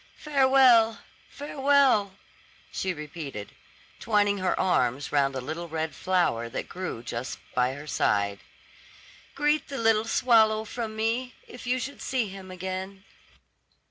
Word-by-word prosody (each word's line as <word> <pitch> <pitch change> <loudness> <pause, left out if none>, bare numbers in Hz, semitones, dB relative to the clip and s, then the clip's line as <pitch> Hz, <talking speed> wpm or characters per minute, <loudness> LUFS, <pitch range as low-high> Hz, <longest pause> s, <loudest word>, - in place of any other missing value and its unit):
"Farewell, 260 -6 +4 0.3
farewell," 275 -8 +2 0.6
she 190 - -2
repeated, 150 - -7 0.5
twining 205 -2 +2
her 185 -1 0
arm 140 -8 +2
round 140 -2 +2
a 130 - -3
little 160 +6 -5
red 160 0 -3
flower 145 -11 0
that - - -5
grew 180 -10 -6
just 120 +1 -5 0.2
by 125 +1 +1
her 145 +2 -9
side. 100 -8 0 1.0
"Greet 295 +1 +1
the 275 - -6
little 225 -1 +3
swallow 220 -2 +3
from 220 -1 -5
me, 230 +3 -1
if 245 0 -10
you 250 +1 +2
should 265 +3 -6
see 250 -6 -1
him 190 -1 -10
again." 190 +1 -6
200 Hz, 130 wpm, -27 LUFS, 155-245 Hz, 1.0 s, Farewell